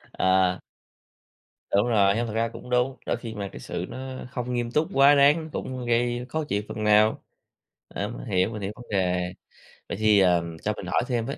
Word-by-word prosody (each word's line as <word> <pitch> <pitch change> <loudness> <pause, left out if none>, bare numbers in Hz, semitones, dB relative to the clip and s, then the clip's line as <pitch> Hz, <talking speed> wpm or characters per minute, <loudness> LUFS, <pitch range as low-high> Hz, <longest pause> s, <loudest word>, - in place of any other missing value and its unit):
Ờ. 95 -1 +1 1.1
Đúng 100 +4 +3
rồi, 100 -3 +3
hông 120 - 0
thật 110 - -5
ra 115 +1 +1
cũng 115 +2 -11
đúng. 125 +2 +1
Đôi - - 0
khi 115 -2 -7
mà 100 -1 -4
cái - - -9
sự - - -5
nó 130 0 -7
không 125 -1 -4
nghiêm 120 -1 -1
túc 150 +5 +1
quá 140 +1 +6
đáng 150 +3 +4
cũng 130 -2 -5
gây 120 +1 0
khó 160 -1 -2
chịu 105 -7 -1
phần 110 - -4
nào, 105 +1 +4 0.7
ờ, 100 - -4
mình 120 - -8
hiểu, 95 -2 +1
mình 105 -3 -6
hiểu 100 +2 -3
vấn 120 - -11
đề. 90 -2 +1 0.7
Vậy - - -3
thì, 105 -2 +4
ờ, 90 -3 +4 0.2
cho 105 - 0
mình - - -7
hỏi - - +1
thêm 120 -3 -1
với. 140 - -5
115 Hz, 210 wpm, -25 LUFS, 100-125 Hz, 1.1 s, quá